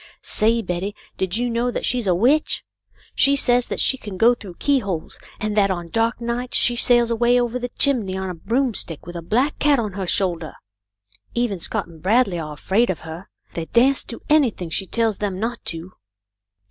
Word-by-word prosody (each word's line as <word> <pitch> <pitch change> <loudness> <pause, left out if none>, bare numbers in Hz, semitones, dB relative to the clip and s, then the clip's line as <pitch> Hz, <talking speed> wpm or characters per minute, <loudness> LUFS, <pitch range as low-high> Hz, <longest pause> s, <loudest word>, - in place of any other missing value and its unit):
"Say, 230 +1 +2
Betty, 185 +3 -3 0.2
did 190 +2 -1
you 245 +1 0
know 235 +1 0
that - - -3
she's 245 -4 0
a 180 - +3
witch 265 - +2 0.3
f - - -30
She 280 0 +4
says 245 -3 +2
that - - -2
she 265 - +3
can 205 -6 -8
go 235 +5 +5
through 200 -7 -10
keyholes, 200 - -1 0.2
and 215 -1 -2
that 200 -2 +3
on 175 -3 -3
dark 225 +4 0
nights 240 +1 -2
she 240 - +4
sails 240 -1 +4
away 240 +2 +3
over 240 0 -1
the 245 0 -4
chimney 225 -10 +1
on 190 0 -3
a 180 - -4
broomstick 225 - -1
with 175 +1 -9
a 170 - -4
black 245 - 0
cat 290 -1 +4
on 215 -5 -2
her 190 -1 -4
shoulder. 170 -5 -1 0.8
Even 235 -6 0
Scott - - -2
and 165 -2 -15
Bradley 195 -1 +2
are 155 -2 -5
afraid 195 +10 +1
of 185 - -2
her. 165 +3 -9 0.2
They 165 - -4
dasn't 260 +3 +3
do 230 - -7
anything 245 - +2
she 195 - 0
tells 225 -2 0
them 195 -3 -2
not 230 +2 -3
to." 165 +2 -5
220 Hz, 200 wpm, -22 LUFS, 185-245 Hz, 0.8 s, go